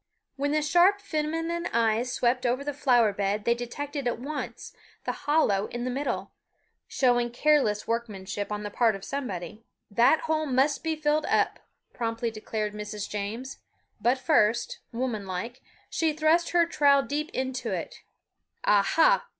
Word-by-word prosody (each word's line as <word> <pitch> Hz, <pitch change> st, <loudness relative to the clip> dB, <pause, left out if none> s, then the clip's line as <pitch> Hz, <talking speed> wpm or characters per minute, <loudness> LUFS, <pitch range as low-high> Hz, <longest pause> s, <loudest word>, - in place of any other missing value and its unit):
When 285 Hz, +1 st, -1 dB
the 305 Hz, 0 st, +1 dB
sharp 350 Hz, +6 st, +4 dB
feminine 330 Hz, -1 st, -2 dB
eyes 230 Hz, +2 st, +1 dB
swept 245 Hz, +1 st, +1 dB
over 250 Hz, +2 st, 0 dB
the 290 Hz, 0 st, -3 dB
flower 245 Hz, -7 st, +3 dB
bed 200 Hz, +1 st, -1 dB
they 235 Hz, -, +4 dB
detected 275 Hz, +3 st, -4 dB
at 240 Hz, -, 0 dB
once 285 Hz, +5 st, -6 dB, 0.3 s
the -, -, 0 dB
hollow 250 Hz, -10 st, +1 dB
in 240 Hz, 0 st, -5 dB
the 255 Hz, -, -2 dB
middle, 245 Hz, -8 st, -3 dB, 0.6 s
showing 245 Hz, -2 st, +2 dB
careless 240 Hz, -5 st, +2 dB
workmanship 210 Hz, -3 st, -3 dB
on 210 Hz, 0 st, -3 dB
the 205 Hz, -, -5 dB
part 225 Hz, -1 st, +2 dB
of 195 Hz, -, -8 dB
somebody. 215 Hz, -6 st, -5 dB, 0.3 s
"That 240 Hz, +9 st, +4 dB
hole 315 Hz, -1 st, 0 dB
must 275 Hz, +2 st, +2 dB
be 320 Hz, -1 st, 0 dB
filled 305 Hz, 0 st, +1 dB
up," -, -, +1 dB, 0.3 s
promptly 230 Hz, 0 st, -2 dB
declared 215 Hz, -1 st, -4 dB
Mrs. 210 Hz, 0 st, -5 dB
James; 225 Hz, +7 st, -5 dB, 0.4 s
but 240 Hz, +5 st, +3 dB
first, 240 Hz, -5 st, +2 dB
woman 230 Hz, -4 st, -3 dB
like, 190 Hz, +7 st, -5 dB, 0.3 s
she 320 Hz, -2 st, 0 dB
thrust 315 Hz, +3 st, +2 dB
her 345 Hz, -1 st, +4 dB
trowel 285 Hz, -4 st, +4 dB
deep 300 Hz, +3 st, -3 dB
into 260 Hz, -4 st, -3 dB
it. -, -, -5 dB, 0.6 s
"Aha! 325 Hz, -, +4 dB
250 Hz, 150 wpm, -27 LUFS, 215-300 Hz, 0.6 s, sharp